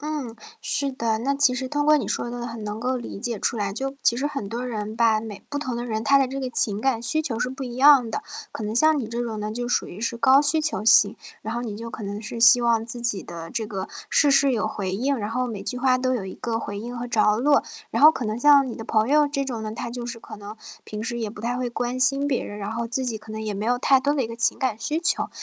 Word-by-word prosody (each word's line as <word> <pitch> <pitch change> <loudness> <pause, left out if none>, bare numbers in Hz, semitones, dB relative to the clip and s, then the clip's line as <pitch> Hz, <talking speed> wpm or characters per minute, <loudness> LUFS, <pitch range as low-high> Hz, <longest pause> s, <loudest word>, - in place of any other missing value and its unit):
嗯， 295 -6 -4 0.3
是 280 -1 -1
的。 230 -4 -1
那 265 +5 0
其 275 -2 +3
实 260 +1 -3
通 290 +1 -1
过 305 0 +6
你 295 - -2
说 240 - -2
的， 240 0 -5
很 230 -2 -6
能 210 +1 -5
够 255 +2 0
理 235 -4 -7
解 235 -2 -3
出 230 - -1
来。 200 -2 -2
就 270 +6 -4
其 235 - +3
实 270 +4 -1
很 275 -9 -4
多 240 +4 -4
人 215 -2 -4
吧， 225 -2 +3
每 215 -3 -9
不 290 - -3
同 255 -4 -3
的 240 - -3
人， 220 -2 -2
他 275 +4 +5
的 270 - +3
这 270 +2 -5
个 260 -1 -3
情 210 -4 0
感 260 -2 +1
需 310 +7 -1
求 250 -7 -3
是 250 - 0
不 265 +1 -7
一 245 -2 -6
样 265 -3 +6
的。 - - -3 0.3
可 220 - -6
能 210 +1 -3
像 310 +5 +4
你 240 - -3
这 235 +2 -3
种 225 -3 -4
呢 210 0 -3
就 240 +2 -3
属 - - +1
于 185 - -10
是 235 +1 -2
高 260 +4 +5
需 305 +2 +2
求 295 -10 -2
型， 210 -2 +6 0.3
然 220 +2 -5
后 240 - -2
你 215 -4 -5
就 230 +2 -7
可 225 -1 -8
能 205 +1 -5
是 230 +1 -6
希 230 +1 +8
望 230 -2 +2
自 240 +1 -7
己 235 -5 -1
的 165 -1 -8
这 230 -3 -2
个 195 -2 -5 0.2
事 295 - +4
事 275 0 +4
有 230 -4 0
回 200 -3 -3
应， 260 +9 0
然 210 -3 -4
后 250 +2 -1
每 215 -5 -5
句 215 +5 -4
话 255 0 +3
都 255 0 0
有 225 -6 -3
一 190 - -7
个 230 -1 -3
回 205 -2 -5
应 240 +2 -6
和 245 - -4
着 215 -3 +3
落。 285 +3 +4 0.3
然 - - -1
后 305 - +11
可 265 - -5
能 215 0 -2
像 285 0 +6
你 245 - -5
的 225 - -7
朋 215 +1 +1
友 295 +1 +4
这 275 -1 -1
种 240 -4 -4
呢， 215 - -4
他 230 - -5
就 240 0 -6
是 240 -1 -6
可 220 - -10
能 205 +2 -9 0.3
平 210 - -7
时 235 +1 -3
也 220 - -3
不 210 - -11
太 240 +2 -2
会 250 -1 -2
关 245 +2 -3
心 275 +2 +3
别 275 -3 0
人， 205 - -7
然 205 +1 -4
后 230 0 -3
自 260 +3 -2
己 230 - -2
可 215 - -14
能 220 0 -5
也 215 -1 -3
没 200 +2 -4
有 245 +2 +1
太 265 +1 +4
多 285 +2 +1
的 280 -4 0
一 - - -3
个 230 - -7
情 230 - 0
感 260 -6 0
需 295 +8 -2
求。 345 - 0
235 Hz, 320 characters per minute, -24 LUFS, 220-265 Hz, 0.3 s, 后